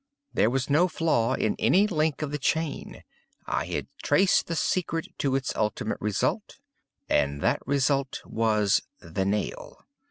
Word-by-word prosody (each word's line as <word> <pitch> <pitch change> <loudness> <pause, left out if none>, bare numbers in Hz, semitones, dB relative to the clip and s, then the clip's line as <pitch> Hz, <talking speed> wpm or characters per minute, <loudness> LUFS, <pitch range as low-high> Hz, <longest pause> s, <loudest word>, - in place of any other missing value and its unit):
There 110 - +3
was 130 +2 -1
no 155 +6 +4
flaw 150 -8 +1
in 110 - 0
any 195 +4 +4
link 155 -6 0
of 145 - -3
the 150 - -3
chain. 160 +1 -2 0.4
I - - -2
had - - -3 0.2
traced 185 +6 +3
the 165 - -2
secret 165 -1 -1
to 135 -2 +1
its 135 -1 -2
ultimate 105 -1 -2
result,—and 105 - -2
that - - +1
result 140 -1 +1
was 110 -3 +2 0.2
_the 95 +3 -3
nail. 105 +1 -3
140 Hz, 145 wpm, -27 LUFS, 110-160 Hz, 0.4 s, no